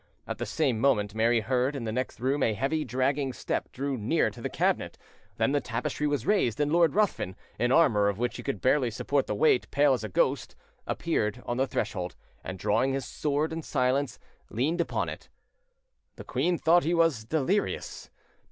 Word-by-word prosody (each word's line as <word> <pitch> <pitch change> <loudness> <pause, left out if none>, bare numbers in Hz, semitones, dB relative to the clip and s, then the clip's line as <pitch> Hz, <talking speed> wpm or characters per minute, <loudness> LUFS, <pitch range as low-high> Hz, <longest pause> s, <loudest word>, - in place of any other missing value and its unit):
At - - -5
the - - -3
same 120 -4 0
moment, 105 -6 +2
Mary 115 +1 +2
heard 130 +4 0
in 135 - -4
the 110 - -2
next 125 +1 -3
room 135 +4 0
a 110 -4 +2
heavy, 140 +7 0
dragging 130 +1 0
step - - -3
drew 140 +1 -2
near 105 - +1
the - - -6
cabinet, - - 0 0.4
then - - +2
the 145 0 +1
tapestry 125 +5 -2
was 145 -5 -1
raised, 150 - +2
and 145 0 +1
Lord 170 -2 +4
Ruthven, 200 - 0 0.2
in 120 +1 +2
armour 115 -10 +4
of 100 - -3
which 120 +2 -2
he - - -6
could 140 - -4
barely 130 -1 +3
support 135 +4 -1
the 105 - -1
weight, 125 +1 +3
pale 140 0 +4
as 120 -4 -2
a 110 - -4
ghost, - - 0 0.3
appeared 125 -7 -1
on 120 - -2
the 135 +1 +1
threshold, 90 -7 -3 0.3
and, 95 - -6
drawing 110 +8 +1
his 135 -2 -2
sword 150 +2 -1
in 165 - -3
silence, 130 -1 0 0.3
leaned 155 +10 0
upon - - -1
it. - - -8 0.9
The - - -9
queen 165 +7 0
thought 170 +2 +4
he 170 +3 +1
was 165 -9 +2
delirious. 160 - -1
130 Hz, 190 wpm, -28 LUFS, 115-150 Hz, 0.9 s, Lord